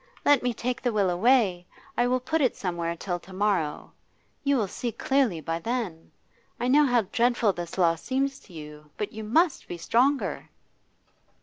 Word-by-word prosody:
Let 290 -3 +5
me 245 - 0
take 245 +1 -3
the 245 - 0
will 200 -4 +2
away. 190 -3 +2 0.3
I 240 - +2
will 255 +1 +2
put 305 +6 -1
it 255 - +2
somewhere 170 -2 -3
till 175 +1 -3
to 185 - -16
morrow. 190 -6 -1 0.5
You 280 -1 +2
will 215 -5 0
see 235 +5 -4
clearly 250 - +1
by 165 +2 -3
then. 215 -7 -4 0.5
I 240 - -1
know 290 +2 +5
how 245 -3 +3
dreadful 230 +1 +2
this 175 0 -6
loss 165 -3 +2
seems 270 +1 -1
to 185 - -18
you, 150 -1 -10
but 210 - -3
you 220 0 -6
must 310 +9 +2
be 175 - -6
stronger. 255 +10 +1
215 Hz, 180 wpm, -26 LUFS, 175-255 Hz, 0.5 s, Let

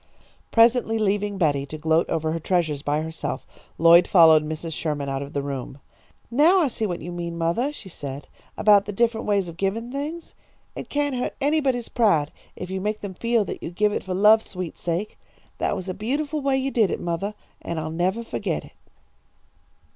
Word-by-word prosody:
Presently 230 0 +4
leaving 205 -1 0
Betty 145 -6 +1
to 155 - -7
gloat 160 +2 +1
over 160 -1 -1
her 165 - -2
treasures 160 -4 0
by 150 +1 0
herself, 160 0 -4 0.3
Lloyd 170 +2 +7
followed 160 -4 +7
Mrs. 155 +1 -5
Sherman 150 -3 -3
out 135 0 -2
of 140 +1 -7
the 140 - -2
room. 135 -1 -5 0.5
"Now 310 +10 +5
I 300 - +2
see 225 -2 -2
what 175 -4 -4
you 175 - -6
meant, 170 -1 -5
mothah," 170 - 0
she 255 -9 -9
said, 140 -5 -7 0.3
"about 205 -1 +5
the 205 - -4
different 230 +2 0
ways 200 -3 +1
of 170 -1 -9
givin' 220 +6 -2
things. 300 +5 -5 0.4
It - - -7
can't 290 -1 0
hurt 250 - -3
anybody's 275 -4 +1
pride 165 - +2 0.2
if 180 0 -7
you 190 0 -3
make 210 +2 -2
them 200 -2 -6
feel 230 +1 +1
that - - -6
you - - -5
give 210 +4 +1
it - - -1
for 185 -1 -3
love's 215 +3 +5
sweet 180 -3 -5
sake. 175 +5 -3 0.4
That - - 0
was 185 - -6
a 185 - -2
beautiful 285 - -2
way 275 -1 +1
you 265 +1 -1
did 220 -7 +3
it, - - -2
mothah, 175 +5 -3 0.3
and 170 -1 -4
I'll 155 0 -4
never 185 +7 -1
fo'get - - -3
it." - - -17
190 Hz, 200 wpm, -24 LUFS, 160-230 Hz, 0.5 s, Lloyd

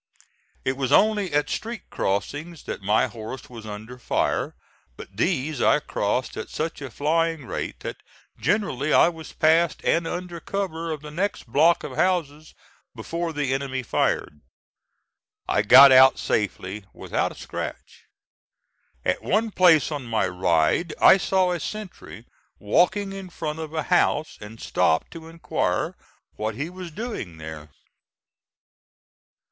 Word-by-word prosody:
It 130 0 0
was 135 -2 -2
only 210 -4 +3
at 145 0 +1
street 230 -2 -5
crossings 145 - -3
that - - -6
my 105 +3 +3
horse 115 +3 -8
was 115 -2 -9
under 110 +4 -8
fire, - - -1 0.4
but 95 - -11
these 145 - -1
I - - +4
crossed - - -2
at - - -5
such 160 0 -4
a 135 - -5
flying 160 +3 0
rate - - -5
that - - -5 0.4
generally 150 - 0
I - - +6
was 165 -2 -10
past 160 +1 +3
and 165 0 +2
under 175 -1 -5
cover 170 -4 -3
of 155 -2 -4
the 150 - -8
next 190 +6 -2
block 150 +8 +3
of - - -6
houses 155 -5 -1 0.4
before 170 0 -3
the 145 -4 -1
enemy 135 -1 -2
fired. 75 -8 -1 1.1
I 105 - +2
got 130 +6 +9
out 130 0 +7
safely 105 -1 -2
without - - -2
a - - -12
scratch. - - -7 1.0
At 90 - 0
one 220 +3 0
place 165 -7 +5
on 145 -4 -4
my 115 -4 +1
ride, 90 - +1
I - - +8
saw 190 -1 +1
a 175 - -1
sentry 210 +3 -8 0.3
walking 190 - +1
in 195 -1 -8
front 160 -2 -5
of 160 -1 -6
a 160 -1 -2
house, 155 +2 +1
and 105 +2 -10
stopped 80 - +1
to 160 -1 -10
inquire 165 0 -2 0.4
what 110 0 -2
he 150 +8 -4
was 180 -1 -8
doing 165 - -6
there. 80 -1 -9
150 Hz, 145 wpm, -24 LUFS, 115-175 Hz, 1.1 s, got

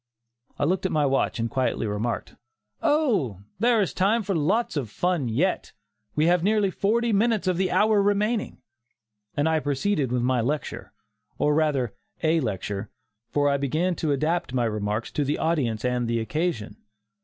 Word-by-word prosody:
I - - -1
looked 185 +5 +1
at - - -6
my 150 -2 +2
watch 135 -1 +1
and 115 0 0
quietly 130 -2 -1
remarked, 105 +3 -3 0.5
"Oh! 235 - +1 0.2
there 235 +1 +4
is 195 - -1
time 215 +5 +2
for 195 - -1
lots 190 +9 +1
of 135 -7 -2
fun 170 - 0
yet; 160 +12 0 0.4
we 150 - +3
have 175 0 +4
nearly 205 +1 +2
forty 225 +4 +1
minutes 215 0 +2
of 185 -1 +2
the 185 0 +1
hour 210 -1 +3
remaining," 210 +2 0 0.7
and 145 +2 +2
I 160 -1 +2
proceeded 145 -1 0
with 125 -1 0
my 125 -1 +2
lecture, 145 +6 -3 0.5
or 150 - +2
rather 145 -7 +1 0.3
a 160 +1 +3
lecture, 100 - -3 0.4
for 145 0 +1
I 140 0 +2
began 155 +7 0
to 155 - 0
adapt 155 0 0
my 120 -2 +2
remarks 105 0 -2
to 150 - 0
the 145 +2 -1
audience 125 -9 0
and 125 -1 0
the 115 0 0
occasion. 140 -1 -2
155 Hz, 170 wpm, -25 LUFS, 125-190 Hz, 0.7 s, there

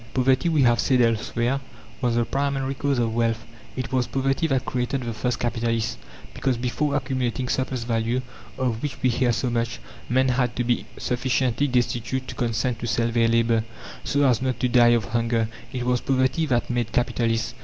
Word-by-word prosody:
Poverty, 130 +5 +3
we 155 -4 +3
have 120 -1 +4
said 130 0 +3
elsewhere, 120 +2 +1 0.4
was 120 -2 +1
the 120 0 +2
primary 135 0 -1
cause 140 0 0
of 115 -2 0
wealth. 115 -1 0 0.3
It 130 -1 -4
was 125 -2 +1
poverty 135 +4 0
that 135 -4 0
created 125 +1 -1
the 120 -1 -3
first 125 +2 -1
capitalist; 115 -1 -1 0.3
because, 130 -3 0
before 130 +4 -1
accumulating 130 -2 -1
"surplus 130 -1 -1
value," 115 +1 0 0.4
of 120 -3 -1
which 145 - -3
we 130 - +4
hear 120 +1 +2
so 120 +2 -1
much, 115 0 -1 0.3
men 130 +1 +3
had 125 -1 +1
to 125 - 0
be 120 0 0
sufficiently 125 +2 0
destitute 125 0 -1
to - - -5
consent 115 0 -1
to 120 - -4
sell 115 +1 +1
their 115 0 +3
labour, 115 -1 +2 0.4
so 145 0 +2
as 125 -2 +3
not 130 -1 -1
to 125 - +3
die 120 -1 +5
of 120 -3 +3
hunger. 115 0 0 0.2
It 125 -1 -3
was 125 -1 +1
poverty 135 +4 +1
that 125 -2 0
made 120 -2 -1
capitalists. 115 -2 0
125 Hz, 185 wpm, -24 LUFS, 115-130 Hz, 0.4 s, die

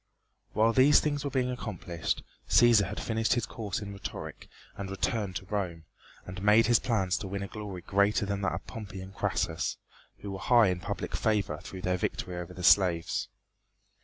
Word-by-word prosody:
While 115 +1 +3
these 135 +4 +6
things 145 -2 -1
were 140 - -1
being 130 -2 0
accomplished 90 -8 -3 0.3
Cæsar 115 -5 +6
had 105 - -5
finished 110 0 +1
his 120 - 0
course 115 0 -4
in 100 -1 -6
rhetoric 100 - -7 0.3
and 100 -1 -5
returned 100 0 -2
to 95 - -4
Rome, 90 -5 -3 0.4
and 90 +1 -7
made 105 +3 +5
his 120 -1 +5
plans 95 -7 0
to 100 - -5
win 100 +1 -4
a - - -4
glory 100 -4 -7
greater 100 +3 +2
than 100 0 -2
that 100 - 0
of 85 - -7
Pompey 100 -4 -8
and 95 +1 -9
Crassus, 90 -5 -1 0.4
who 100 - -7
were 95 - -5
high 115 +1 +5
in 90 -1 -1
public - - -4
favor 100 -9 0
through 95 0 -9
their 90 -1 +1
victory 90 0 -3
over 90 0 -6
the 90 - -7
slaves. 85 -3 +4
100 Hz, 190 wpm, -29 LUFS, 95-110 Hz, 0.4 s, these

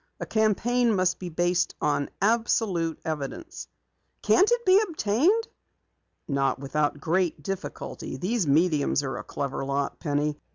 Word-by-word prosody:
A - - -4
campaign 225 +2 +2
must 185 -1 +1
be 180 - -5
based 175 +1 0
on 145 -1 0
absolute 200 -6 +1
evidence." 160 - -5 0.6
"Can't 385 +3 +4
it 480 0 +1
be 375 +1 +6
obtained?" 340 - +1 0.8
"Not 140 -1 +1
without 145 +2 -1
great 165 -1 0
difficulty. 195 +3 -5
These 200 -1 -1
mediums 150 -1 +2
are 135 - -3
a - - -6
clever 140 -1 -4
lot, 140 +1 -2
Penny. 150 0 -1
175 Hz, 130 wpm, -26 LUFS, 145-225 Hz, 0.8 s, be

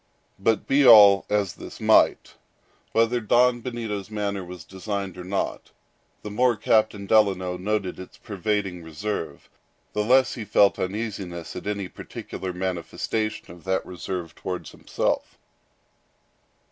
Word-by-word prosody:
But 110 +3 +1
be 140 +1 +3
all 105 -5 +8
this 105 -3 -1
as - - -9
it - - -9
might, - - +4 0.6
whether 115 +2 +2
Don 120 +2 +3
Benito's 110 -5 -4
manner 100 -2 -3
was 90 -2 -9
designed 100 -1 -5
or 90 - -8
not, 95 +2 -3 0.5
the 105 - -6
more 125 +3 +3
Captain 105 -1 +1
Delano 95 -4 +2
noted 95 0 -2
its 95 - -11
pervading 100 -3 -2
reserve, 80 -1 -5 0.5
the 105 - 0
less 130 +4 +4
he 115 - -5
felt 100 -1 +3
uneasiness 95 -4 -4
at - - -7
any 100 -2 -2
particular 95 +1 -7
manifestation 95 +4 -3
of 85 0 -14
that 95 0 0
reserve 90 -2 -5
towards 90 -1 -6
himself. - - -2
100 Hz, 135 wpm, -25 LUFS, 90-110 Hz, 0.6 s, all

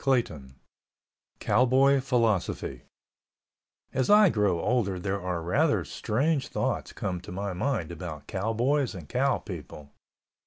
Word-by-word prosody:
CHAPTER 125 -6 +2
XX 65 -1 -15 0.9
COWBOY 130 +5 +4
PHILOSOPHY 115 - 0 1.1
As 130 0 0
I 210 -1 +7
grow 105 - +1
older 105 -3 0
there 95 +2 -3
are 90 -2 -3
rather 90 +2 +1
strange 140 +5 -1
thoughts - - -2
come 90 -2 -4
to - - -10
my 100 +1 -3
mind 95 - -2
about 80 -3 -7
cowboys 115 +6 0
and 85 -5 -9
cow - - +1
people. 75 -2 -9
105 Hz, 125 wpm, -27 LUFS, 90-130 Hz, 1.1 s, I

